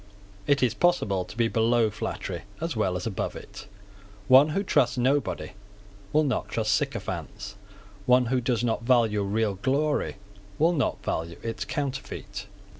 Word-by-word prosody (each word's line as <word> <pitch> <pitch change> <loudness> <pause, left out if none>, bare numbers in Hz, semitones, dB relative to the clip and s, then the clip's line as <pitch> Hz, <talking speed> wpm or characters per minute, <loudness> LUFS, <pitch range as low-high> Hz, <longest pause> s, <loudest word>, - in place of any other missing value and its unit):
It 140 -2 +3
is 120 -3 +3
possible 110 - +2
to 90 +4 -12
be 115 -1 +3
below 115 0 +2
flattery 105 - -4 0.2
as 165 -2 -3
well 95 -4 0
as 90 - -5
above 105 -5 -3
it. - - -10 0.6
One 135 +5 +7
who 195 +6 0
trusts 125 -10 +2
nobody 120 - 0 0.6
will 155 +1 +4
not 135 -4 -1
trust 110 -2 0
sycophants. 100 0 -3 0.5
One 125 0 +5
who 125 +2 +1
does 120 -1 0
not 115 -2 0
value 115 -4 +3
real 105 +1 0
glory 145 +3 +1 0.4
will 165 +3 +3
not 140 -7 -1
value 85 +1 -3
its 115 -3 -3
counterfeit. 130 -8 -4
115 Hz, 150 wpm, -27 LUFS, 105-135 Hz, 0.6 s, One